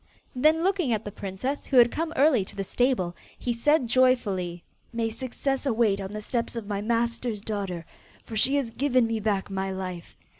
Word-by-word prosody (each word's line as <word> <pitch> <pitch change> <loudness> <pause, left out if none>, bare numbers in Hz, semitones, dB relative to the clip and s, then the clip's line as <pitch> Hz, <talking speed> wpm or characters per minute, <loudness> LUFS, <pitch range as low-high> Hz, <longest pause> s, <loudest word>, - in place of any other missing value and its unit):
Then 310 +5 +3
looking 370 -8 +1
at 220 -1 -2
the 205 - -5
princess 205 +8 -4
who 270 - +2
had 240 -1 +7
come 325 0 -2
early 275 -7 +4
to - - -11
the 195 - -2
stable, 195 -5 0 0.2
he 245 - -1
said 285 +4 +3
joyfully, 210 -9 +1 0.3
'May 230 -1 -1
success 260 +3 -2
await 220 -5 +2
on 190 0 -5
the 215 0 -6
steps 235 +1 -2
of 230 -3 -4
my 200 -1 -3
master's 230 0 -1
daughter, 195 -6 -3 0.4
for 225 - -7
she 265 +6 +3
has 270 -5 0
given 255 0 +2
me 225 -1 -1
back 205 -2 -1
my 195 0 -2
life. 185 -3 -6
230 Hz, 190 wpm, -26 LUFS, 200-255 Hz, 0.4 s, had